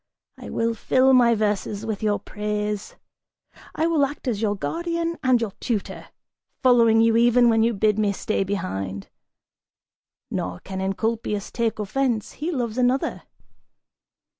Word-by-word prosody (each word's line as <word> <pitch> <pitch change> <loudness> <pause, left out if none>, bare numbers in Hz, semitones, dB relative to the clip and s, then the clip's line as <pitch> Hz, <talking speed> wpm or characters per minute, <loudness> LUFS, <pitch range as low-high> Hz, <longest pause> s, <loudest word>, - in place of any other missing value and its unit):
I - - -8
will 230 0 0
fill 260 +4 +3
my 240 -2 +5
verses 210 0 -1
with 215 -3 -3
your 210 -1 +1
praise! 210 -1 -4 0.8
I 320 - +1
will 330 -3 +2
act 280 0 -3
as 225 -4 -1
your 210 -2 +1
guardian 335 - -3
and 255 -2 +4
your 225 -3 -2
tutor, 220 -5 -3 0.6
following 230 -3 +5
you 225 0 +4
even 240 +1 +5
when 225 -1 +3
you 230 0 +2
bid 210 +1 +2
me 210 -1 +2
stay 215 +1 -1
behind! 95 - -4 1.2
Nor 90 -1 -3
can 190 0 -6
Encolpius 210 +1 -2
take 230 -2 -1
offense, 220 +2 -1
he 320 +4 -4
loves 245 -5 -2
another." 250 +2 +1
225 Hz, 140 wpm, -23 LUFS, 205-250 Hz, 1.2 s, my